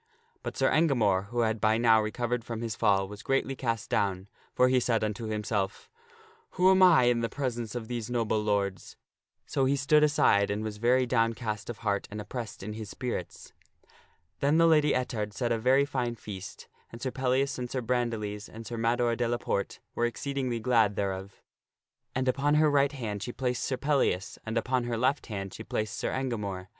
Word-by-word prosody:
But - - -6
Sir - - +3
Engamore, 110 - +2
who 120 +2 -1
had 110 -2 0
by 110 +1 +3
now 115 -1 +5
recovered 120 +2 -2
from 115 -1 -5
his 115 -3 -3
fall, 95 -1 +2
was 105 +1 -9
greatly 135 +2 0
cast 115 -4 -2
down, 100 -1 0 0.3
for 125 - +5
he 130 0 +3
said 115 -3 +1
unto 110 +2 -3
himself, 105 -2 -2 0.3
" 450 0 -28
Who 185 +1 +6
am 190 0 +4
I 175 -8 +7
in 120 -1 +3
the 115 0 -1
presence 120 -4 -3
of 115 -2 -4
these 120 -2 -4
noble 115 -3 0
lords?" 100 -3 -1 0.5
So 135 - 0
he 135 +2 +2
stood 145 +2 +4
aside 120 -9 +4
and 105 +1 -2
was 110 -1 -4
very 125 +3 +3
downcast 115 -3 -1
of 120 - -5
heart 100 -1 0
and 105 - -6
oppressed 110 -1 -6
in 105 +2 -5
his 110 -1 -7
spirits. 120 -6 -5 0.9
Then 145 +3 +3
the 165 - +5
Lady 150 -3 +4
Ettard 110 -5 -2
set 120 +2 -1
a 115 - +1
very 130 +4 +4
fine 125 -4 -2
feast 95 -4 -9 0.2
and 115 - -9
Sir 130 +1 -3
Pellias 130 +1 0
and 125 -1 -4
Sir 130 - -2
Bran 120 0 0
diles 105 -2 -5
and 115 +1 -10
Sir 115 +2 -5
Mador 115 +1 +1
de 120 0 0
la 120 +1 0
Porte 100 -4 -3
were 120 - +1
exceedingly 130 -1 -3
glad 110 -3 +3
thereof. 95 0 -4 0.7
And 130 0 0
upon 140 +3 +2
her 155 0 +4
right 140 -1 +3
hand 110 -7 -4
she 120 - -4
placed 125 -1 -2
Sir 130 - -1
Pellias, 130 -9 0
and 110 +1 -1
upon 125 +1 0
her 120 -1 -2
left 130 +5 +1
hand 95 -3 -5
she 110 - -8
placed 110 -1 -3
Sir - - -2
Engamore. 105 -8 -3
120 Hz, 200 wpm, -29 LUFS, 105-130 Hz, 0.9 s, I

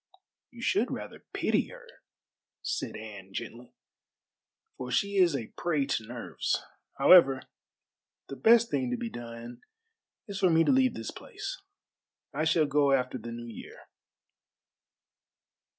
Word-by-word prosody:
"You - - -11
should - - +2
rather - - -7
pity - - +1
her," - - -12 0.8
said - - -3
Anne 100 -3 -9
gently, 120 +5 -7 1.0
"for 125 -1 -6
she 200 +11 0
is 175 -5 +5
a 115 -5 -5
prey 155 -5 0
to 110 -4 -2
nerves. 120 0 -2 0.3
However, 135 -8 +7 0.8
the 135 - -6
best 230 - +5
thing 255 - 0
to 250 - -1
be 235 -1 -4
done 120 - -8 0.7
is 200 -2 -5
for 185 - +4
me 165 0 +5
to - - +3
leave 260 -1 +3
this 115 - -5
place. - - -7 0.7
I 155 +3 0
shall 160 -1 +3
go 145 -1 +3
after 130 -1 0
the 115 +1 -7
New 120 0 -7
Year." 115 -2 -10
140 Hz, 135 wpm, -29 LUFS, 120-190 Hz, 1.0 s, However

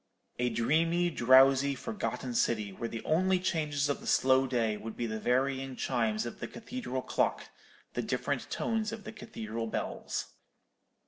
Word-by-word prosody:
A 125 0 +2
dreamy, 165 +9 +2
drowsy, 135 +1 +5
forgotten 135 - -4
city, 110 -3 +1
where 115 +4 -4
the 115 - -6
only 185 +4 +3
changes 150 -5 0
of 145 - -1
the - - -10
slow 130 0 +4
day 115 -4 +1
would 110 +1 -7
be 120 - -1
the 110 -1 -3
varying 135 +2 0
chimes 115 -4 0
of 120 - -6
the - - -4
cathedral 225 - -5
clock, - - 0 0.4
the - - -1
different - - -2
tones 220 -1 -1
of 225 -2 -7
the - - -7
cathedral 115 +1 -5
bells. - - -4
130 Hz, 155 wpm, -31 LUFS, 115-160 Hz, 0.4 s, drowsy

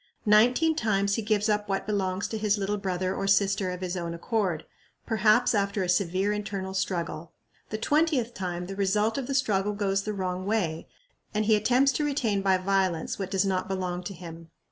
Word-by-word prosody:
Nineteen 245 +10 +4
times 200 -7 +1
he 225 - 0
gives 210 -1 +1
up 210 -1 0
what 195 0 -1
belongs 195 -2 -1
to 220 - -3
his 210 -1 +1
little 205 +1 -1
brother 185 -1 -1
or 195 - -2
sister 195 -1 +2
of 180 0 -5
his 180 0 -3
own 170 -2 -4
accord, 180 -3 -1 0.4
perhaps 215 -1 +3
after 200 -1 0
a 180 - -3
severe 185 +2 +1
internal 195 -2 -4
struggle. 170 -4 -3 0.4
The 215 - -3
twentieth 285 -1 +1
time 180 -3 -4
the 195 +2 -6
result 210 +5 +1
of 255 - -5
the 275 - -2
struggle 210 -6 +1
goes 195 -1 0
the 215 +1 -4
wrong 185 -1 -3
way, 175 -7 -1 0.5
and 215 0 +1
he 220 0 +5
attempts 250 +6 +3
to 300 - -1
retain 240 -9 0
by 190 -1 +3
violence 185 -3 0
what 195 -1 -3
does 190 0 +1
not 185 -1 -1
belong 185 -2 -2
to 195 - -5
him. 165 -1 -10
200 Hz, 195 wpm, -27 LUFS, 185-215 Hz, 0.5 s, he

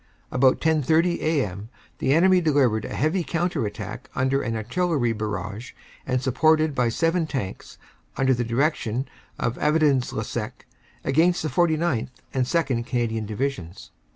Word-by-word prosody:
"About 130 0 +3
10.30 160 +2 +2
a.m. 110 - -1 0.3
the - - +1
enemy 180 +4 +5
delivered 135 -9 +2
a - - -5
heavy 160 +6 +1
counter 165 -5 -1
attack - - -7
under 130 +2 +1
an 115 -2 -2
Artillery 125 +2 0
barrage 105 +1 -5 0.3
and 130 -1 +1
supported 155 +3 +3
by 125 -3 +1
seven 165 +6 +1
Tanks, 115 -11 -5 0.4
from 135 - 0
the 130 -2 +2
direction 125 0 0 0.3
of 120 - -2
Avesnes 150 -4 +2
le - - -3
Sec, - - -5 0.4
against 165 +6 +2
the 155 - -1
49th. 160 -8 +1 0.2
and 130 -1 +1
2nd. 135 -7 0
Canadian 115 -3 -2
Divisions. 105 -6 -4
135 Hz, 140 wpm, -24 LUFS, 115-160 Hz, 0.4 s, enemy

